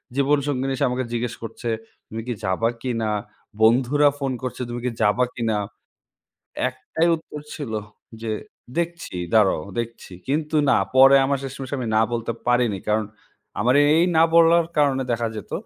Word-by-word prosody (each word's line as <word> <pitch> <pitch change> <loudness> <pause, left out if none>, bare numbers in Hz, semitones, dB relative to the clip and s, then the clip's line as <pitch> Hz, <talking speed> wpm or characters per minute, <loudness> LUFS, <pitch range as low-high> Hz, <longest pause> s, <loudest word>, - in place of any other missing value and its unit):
জীবনসঙ্গিনী 140 -1 +1
এসে 140 +2 +1
আমাকে 125 +1 -2
জিজ্ঞেস 120 0 -2
করছে, 115 +1 -5 0.4
"তুমি 115 +1 -6
কি 120 - -1
যাবা 95 +5 +1
কিনা?" 115 -4 -1 0.5
বন্ধুরা 130 +6 +4
ফোন 135 -2 -1
করছে, 130 - -4
"তুমি 120 0 -4
কি 125 - 0
যাবা 105 +4 +3
কিনা?" 115 -3 0 1.1
একটাই 165 +2 -2
উত্তর 160 -2 -9
ছিল 140 -7 -6 0.5
যে, 110 -1 -3 0.5
"দেখছি 170 - -3 0.2
দাঁড়াও 100 -8 +4 0.2
দেখছি।" 115 -5 -6
কিন্তু 150 +2 -1
না, 130 - +5 0.2
পরে 135 +1 +8
আমার 140 0 +1
শেষমেশ 135 0 -7
আমি 120 -3 -3
না 110 - +5
বলতে 115 0 -2 0.2
পারিনি। 120 -5 +2
কারণ 105 0 +1 0.5
আমার 125 +4 +3
এ - - +4
এই 170 - +4
না 160 - +7
বলার 170 0 +6
কারণে 140 -3 +3
দেখা 115 0 0
যেত 105 - -8
125 Hz, 155 wpm, -23 LUFS, 115-140 Hz, 1.1 s, পরে